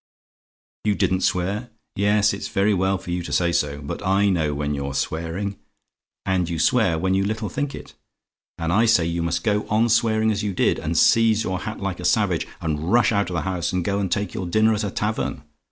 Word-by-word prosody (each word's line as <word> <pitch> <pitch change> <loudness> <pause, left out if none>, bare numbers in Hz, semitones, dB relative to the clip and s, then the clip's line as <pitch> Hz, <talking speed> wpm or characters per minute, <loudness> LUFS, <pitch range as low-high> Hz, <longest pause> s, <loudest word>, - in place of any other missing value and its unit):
"YOU 105 -1 +1
DIDN'T 95 -2 +1
SWEAR? 100 +7 -1 0.3
"Yes; 105 +1 +3
it's 100 - -5
very 100 +2 +1
well 95 +1 +1
for 90 - -8
you 90 0 -1
to 85 - -7
say 85 -1 +2
so; 75 -3 -1
but 70 - -5
I 100 +1 +2
know 80 -5 0
when 75 0 -2
you're 70 -1 -4
swearing; 85 +7 -3 0.7
and 90 -2 0
you 85 - -2
swear 95 -1 +2
when 95 +3 0
you 95 +1 +2
little 110 +1 -2
think 145 -1 -3
it; - - -11 0.6
and 85 0 -1
I 110 +4 +4
say 100 -7 +4
you 85 +1 -2
must 85 0 -1
go 105 -2 0
on 110 +3 +2
swearing 110 -1 +2
as 105 -1 -1
you 100 -3 -3
did, - - +2
and - - -2
seize 115 -1 +4
your 95 -3 -2
hat 110 +1 -6
like 95 -2 -3
a - - -5
savage, - - +1
and 80 +2 -2
rush 120 0 +4
out 100 -3 +1
of 90 - -4
the 85 - 0
house, 95 -2 -2
and 90 -2 -1
go 100 0 0
and 95 -3 -2
take 100 0 -1
your 95 - -4
dinner 110 +5 +3
at 105 0 -1
a 100 - -1
tavern! 105 -9 -2
95 Hz, 225 wpm, -23 LUFS, 85-105 Hz, 0.7 s, I